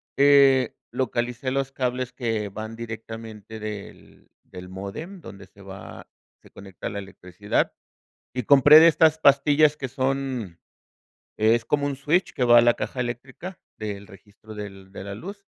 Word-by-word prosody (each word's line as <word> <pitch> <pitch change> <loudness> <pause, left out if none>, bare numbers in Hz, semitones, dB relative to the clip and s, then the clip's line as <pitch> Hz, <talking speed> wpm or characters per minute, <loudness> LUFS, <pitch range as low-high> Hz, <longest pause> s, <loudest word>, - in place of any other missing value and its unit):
eh, 140 -3 +5 0.2
localicé 125 0 -2
los 135 0 -2
cables 125 -1 -2
que 115 -4 -2
van 110 +3 -7
directamente 110 -1 -8
del 105 -2 -9
del 90 0 -11
módem, 100 - -7
donde 100 -7 -11
se 100 - -20
va 95 -1 -11 0.3
se - - -19
conecta 95 -2 -9
la 100 - -5
electricidad, 95 0 -3 0.6
y 125 - -2
compré 145 +5 +8
de 165 - +8
estas 160 -1 +4
pastillas 145 +1 +4
que 140 - -4
son 130 -7 -3 0.8
es 115 +2 +2
como 145 +3 0
un 140 -1 -3
switch 155 +7 +1
que 125 - 0
va 120 0 +7
a - - +6
la 120 0 +4
caja 125 - -4
eléctrica 130 +9 -7 0.2
del 100 -2 -6
registro 105 +2 -15
del 95 -2 -9
de - - -8
la 100 0 -6
luz. 200 - -9
120 Hz, 155 wpm, -24 LUFS, 105-140 Hz, 0.8 s, compré